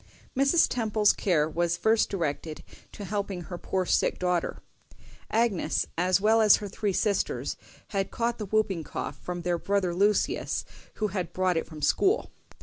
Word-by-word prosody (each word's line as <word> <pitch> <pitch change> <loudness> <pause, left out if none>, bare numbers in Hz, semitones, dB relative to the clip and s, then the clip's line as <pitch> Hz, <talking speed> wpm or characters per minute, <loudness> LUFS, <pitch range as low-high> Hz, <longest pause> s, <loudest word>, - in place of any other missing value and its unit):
Mrs. 275 +6 +4
Temple's 215 -3 +2
care 160 -6 +1
was 170 +1 0
first 220 +4 +2
directed 160 -4 -3 0.3
to 205 - -8
helping 200 -2 -3
her 175 +1 -7
poor 185 -1 -1
sick - - +1
daughter. 180 -2 -1 0.7
Agnes, 215 -8 +1
as 180 +3 +2
well 220 +2 +4
as 215 -2 +7
her 205 - -5
three 200 +1 -2
sisters, 200 +1 0 0.3
had 195 -2 -1
caught 235 0 -2
the 210 - -4
whooping 200 -5 0
cough - - -5
from 175 -1 -5
their 175 -1 0
brother 195 -2 0
Lucius, 205 +3 +1 0.3
who 215 -1 -1
had 180 -3 -4
brought 185 -1 +1
it 165 - -1
from 155 -2 -10
school. 390 - +2
195 Hz, 160 wpm, -27 LUFS, 175-215 Hz, 0.7 s, as